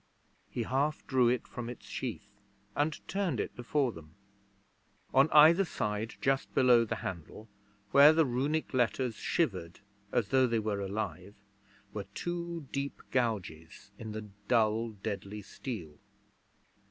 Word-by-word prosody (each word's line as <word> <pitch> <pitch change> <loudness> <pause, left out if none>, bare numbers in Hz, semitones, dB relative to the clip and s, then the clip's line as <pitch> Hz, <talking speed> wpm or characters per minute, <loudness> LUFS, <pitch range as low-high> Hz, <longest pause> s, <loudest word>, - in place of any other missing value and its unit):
He 120 - -2
half 140 +6 0
drew 125 -3 +3
it 125 -1 -1
from 120 -1 -6
its 120 - -9
sheath 105 -5 -6 0.4
and 150 +1 -1
turned 190 - -1
it - - -3
before 125 +2 0
them. 80 -4 -13 1.0
On 135 +3 +5
either 160 +6 +7
side 105 - -3
just 135 0 +1
below 125 -3 +6
the 115 - -2
handle, 95 +5 -6 0.4
where 140 +2 +9
the 160 0 +4
Runic 140 +6 -1
letters 125 0 +1
shivered 95 - -2 0.3
as 110 -4 +1
though 130 -1 +4
they 115 -1 +1
were 105 -2 -1
alive, 100 -1 -4 0.6
were 105 -2 -4
two 170 -3 -4
deep 140 0 -3
gouges 100 -7 -2
in 110 -2 -6
the 110 0 -5 0.2
dull, 115 -1 +2
deadly 100 0 -5
steel. 95 - -7
120 Hz, 135 wpm, -31 LUFS, 105-140 Hz, 1.0 s, where